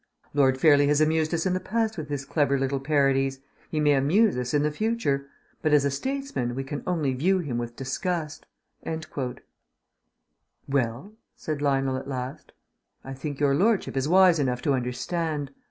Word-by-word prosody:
"Lord 135 -2 +3
Fairlie 145 -2 +5
has 145 0 +3
amused 155 0 +2
us 170 0 -1
in 185 - +1
the 185 - 0
past 220 +4 -1
with 155 -4 -6
his 140 -1 -3
clever 140 -1 +1
little 135 +1 -1
parodies; 135 -2 +1 0.3
he 155 - -2
may 150 -1 +4
amuse 175 +11 +3
us 125 0 -2
in 145 0 +2
the 150 - +1
future; 150 -8 -1 0.3
but 155 -2 +1
as 145 -1 +5
a 140 - +1
statesman 265 - -3
we 135 - -3
can 140 +2 -5
only 155 -7 0
view 180 +9 +2
him 140 -10 -2
with 120 0 -5
disgust...." 155 +4 -3 2.2
"Well?" 135 - -1 0.2
said 155 -2 -4
Lionel 135 -2 +1
at 135 +1 -7
last. 130 -1 -6 0.5
"I 135 - -7
think 140 +1 -6
your 145 -2 +3
lordship 200 +5 +1
is 135 +2 0
wise 185 -2 +6
enough 125 -3 -1
to 145 - +2
understand. 140 +4 -2
145 Hz, 170 wpm, -26 LUFS, 135-165 Hz, 2.2 s, wise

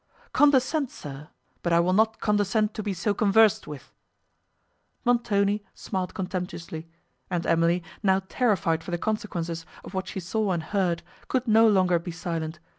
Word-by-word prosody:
"Condescend, 285 0 +3
sir! 145 - -9 0.3
but 170 - -1
I 170 - +5
will 180 +2 +2
not 220 +2 +2
condescend 210 +1 +1
to 215 - -4
be 210 -1 -2
so 195 +3 0
conversed 215 +1 +4
with." 140 -4 -9 1.1
Montoni 210 -4 +2
smiled 185 -2 -4
contemptuously; 180 -3 -5 0.4
and 175 -2 -1
Emily, 165 +1 +2 0.2
now 190 -2 +2
terrified 190 -10 +1
for - - -9
the 175 - -1
consequences 170 -5 -3 0.2
of - - -10
what 190 0 -3
she - - -4
saw 195 +2 -1
and 170 -2 -2
heard, 180 -2 0 0.2
could 255 -1 -1
no 225 +1 +6
longer 185 -4 +4
be 170 - -7
silent. 165 -2 -4
190 Hz, 155 wpm, -26 LUFS, 170-215 Hz, 1.1 s, no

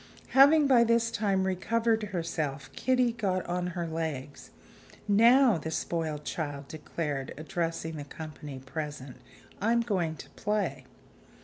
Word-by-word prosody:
Having 285 +3 +7
by 255 -4 +6
this 230 0 +2
time 200 -4 +1
recovered 225 +4 +1
herself, 165 -8 -3
Kitty 255 -2 +2
got 195 -6 -1
on 180 0 -2
her 170 - -1
legs. 155 -4 -5 0.6
"Now," 230 +1 +6
the 160 - -5
spoiled 160 -2 -2
child 145 -3 -4
declared, 150 -3 -4
addressing 165 +1 -3
the 145 - -5
company 150 -1 -8
present, 135 0 -6 0.4
"I'm 230 +3 +3
going 185 -9 -1
to - - -11
play." 195 -12 -2
170 Hz, 125 wpm, -29 LUFS, 150-225 Hz, 0.6 s, Having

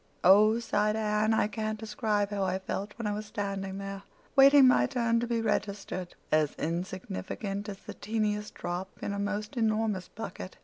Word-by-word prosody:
"Oh," 210 +4 +7
sighed 210 -2 +1
Anne. 215 0 +1
"I 220 - +3
can't 215 +1 -3
describe 210 -1 -1
how 200 -1 -1
I 185 0 0
felt 195 +2 -4
when 230 - -5
I 210 - 0
was 210 +1 -5
standing 195 -2 -3
there, 195 0 -5 0.3
waiting 275 -1 +8
my 250 - +5
turn 235 -3 +1
to 240 - -2
be 230 -1 0
registered—as 190 -7 -1
insignificant 195 +4 -4
as 200 - -6
the - - -6
teeniest 210 -1 -2
drop 175 +2 -4
in 200 - -2
a 200 - -3
most 210 +3 -3
enormous 215 -4 0
bucket. 190 -3 -8
210 Hz, 170 wpm, -29 LUFS, 195-220 Hz, 0.3 s, waiting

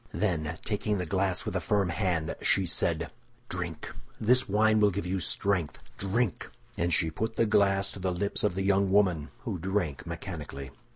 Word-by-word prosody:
Then, 85 -5 -1
taking 105 0 0
the 90 - -2
glass 95 +1 0
with - - -3
a - - +2
firm 100 -3 +1
hand, 85 -4 -1
she 95 - +3
said, 85 - +1 0.4
"Drink. - - -4 0.3
This 125 +2 +3
wine 110 +2 +4
will 105 -1 +5
give 100 0 -3
you 95 +1 -1
strength, 90 -3 0 0.2
drink!" 100 +2 0 0.3
And 85 +1 0
she 80 -2 +2
put 110 +7 -3
the 115 - +3
glass 100 -2 +3
to - - -9
the 95 0 0
lips 100 +3 -2
of 105 -4 +1
the 95 - -1
young 100 0 +3
woman, 90 -7 +3
who 110 -8 -4
drank 90 -5 -2
mechanically. 80 -6 -6
95 Hz, 180 wpm, -29 LUFS, 85-105 Hz, 0.4 s, will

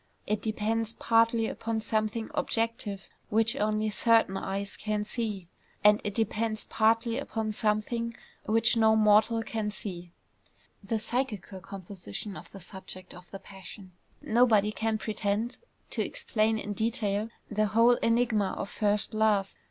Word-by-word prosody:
It 210 0 -1
depends 225 +1 -1
partly 230 0 +3
upon 225 0 -2
something 220 +1 -1
objective 225 -3 -1 0.2
which 225 +3 +2
only 215 -2 0
certain 225 -3 +3
eyes 195 +1 -3
can 215 -1 -2
see; 210 -4 -3 0.4
and 210 +1 +6
it 205 -1 -3
depends 220 0 0
partly 230 +2 +2
upon 220 -5 -3
some 210 0 +2
thing 230 +1 -4 0.3
which 225 +2 +4
no 220 -1 +5
mortal 220 +1 +4
can 220 -2 -2
see, 180 -4 -6 0.7
the 220 +3 -1
psychical 215 -4 -3
composition 190 - -7
of - - -10
the 195 - -10
subject 185 0 -8
of 180 0 -13
the 195 - -7
passion. 190 0 -12 0.3
Nobody 220 -3 +4
can 220 +2 -1
pretend 215 +2 -2 0.3
to - - 0
explain 220 -1 0
in 210 -1 -4
detail 220 -1 0 0.2
the 215 0 +2
whole 230 +3 +5
enigma 230 -4 +1
of 200 - -4
first 210 0 0
love. 215 -3 +2
215 Hz, 140 wpm, -29 LUFS, 205-225 Hz, 0.7 s, and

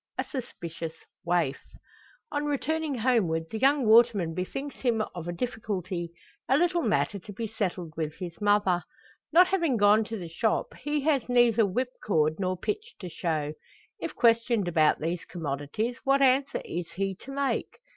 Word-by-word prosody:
A - - 0
SUSPICIOUS 170 - -6 0.3
WAIF. 170 -5 +1 0.7
On 295 0 -1
returning 300 +1 -1
homeward 220 -10 +1
the 220 - -3
young 275 0 +3
waterman 220 -6 +5
bethinks 270 - -4
him 230 -4 +1
of 175 -1 -6
a - - -1
difficulty 185 -5 -3 0.4
a 265 - +5
little 350 +1 +2
matter 210 -4 0
to 205 - -10
be 225 +3 -4
settled 190 -7 -3
with 155 -1 -3
his 175 -1 -8
mother. 205 -4 +3 0.5
Not 355 +3 +6
having 335 -10 +1
gone 210 +1 +5
to 225 +1 -5
the 175 -4 -6
shop, 210 +7 -1
he 295 +1 -2
has 275 -4 +1
neither 240 -3 +4
whipcord 190 -8 0
nor 185 -1 -1
pitch 425 - -4
to 180 - -7
show. 155 -3 -2 0.5
If - - -5
questioned 230 -3 +3
about 160 -3 +3
these 170 +3 -2
commodities, 165 - -3
what 275 0 +3
answer 270 +1 +2
is 170 0 -5
he 195 0 -1
to 275 - -11
make? 280 0 -2
215 Hz, 160 wpm, -28 LUFS, 175-260 Hz, 0.7 s, Not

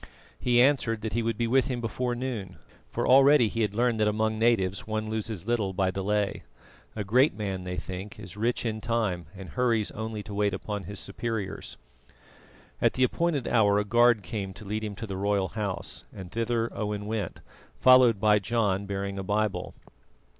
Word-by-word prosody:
He 120 -1 +3
answered 125 -4 +3
that 110 -1 -4
he 120 - +1
would 115 -1 -1
be 120 - 0
with 130 +3 +3
him 125 -3 -2
before 120 +2 -2
noon, 120 -8 -4 0.3
for - - -2
already 135 -2 +6
he 115 - -2
had 105 -2 0
learned 120 -1 +1
that 105 - +3
among 110 +1 0
natives 110 -5 +1
one 110 0 -2
loses 110 -4 -3
little 110 -5 0
by 95 0 +1
delay. 100 +1 -1 0.5
A 105 - -2
great 125 +9 +3
man, 95 -3 -4
they 90 0 -4
think, 95 +6 -6
is 90 0 -9
rich 115 +3 -1
in 110 -1 -2
time, 105 -8 -1
and 95 -2 -9
hurries 115 +2 +1
only 110 -1 -5
to 105 - -8
wait 100 -1 +1
upon 100 0 -5
his 100 +1 -5
superiors. 105 -1 -4 1.0
At - - +3
the 130 - +1
appointed 150 0 0
hour 105 -3 +4
a 105 - +1
guard 120 0 +4
came 95 -3 -5
to 105 - -11
lead 105 +2 -3
him 105 -2 -4
to 115 - -6
the 95 -3 -5
royal 100 -1 0
house, 105 -3 -4
and 95 -3 -9
thither 115 0 -1
Owen 105 -1 -3
went, 105 -4 -3 0.4
followed 130 -4 +6
by 105 0 +4
John 100 -3 0
bearing 100 0 -3
a - - -3
Bible. 105 +1 -1
110 Hz, 190 wpm, -27 LUFS, 100-115 Hz, 1.0 s, already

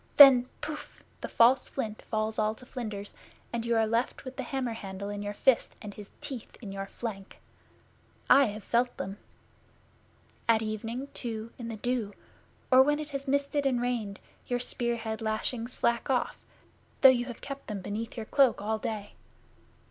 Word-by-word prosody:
Then 265 -3 +10
Pouf! 300 -1 -7 0.2
the - - -3
false 250 +3 +5
flint 220 -5 -4
falls 215 0 -2
all 215 0 +1
to 250 - -12
flinders, 215 -6 -6 0.4
and 235 -1 -1
you 235 - +2
are 225 0 +4
left 230 +5 -1
with 260 0 -7
the 270 - -3
hammer 255 -2 -2
handle 200 -2 -6
in 205 0 -4
your 205 0 -4
fist, 260 +1 +3
and 210 -2 -8
his 205 0 -10
teeth 255 -5 -7
in 210 -5 -7
your 195 0 -5
flank! 200 -3 -7 0.9
I 280 - +7
have 210 -2 -5
felt 245 +1 +1
them. 195 +2 -5 1.3
At 225 -1 +5
evening, 225 +5 -4
too, 225 -2 -4
in 235 - -5
the 230 - -4
dew, 225 -2 -2 0.6
or 260 0 +9
when 295 +2 +3
it 300 -1 -5
has 275 -1 -5
misted 280 +1 +1
and 250 -2 +1
rained, 235 -5 -2 0.3
your 245 - +1
spear 240 -1 0
head 220 -1 -4
lashings 225 +2 -2
slack 235 +2 0
off, 255 -2 0 0.6
though 270 - +11
you 245 -2 +3
have 240 -2 -7
kept 275 0 -7
them 205 -3 -4
beneath 220 +5 -4
your 225 - -4
cloak 270 +1 +4
all 215 +2 -1
day. 210 -2 -4
230 Hz, 180 wpm, -29 LUFS, 215-255 Hz, 1.3 s, though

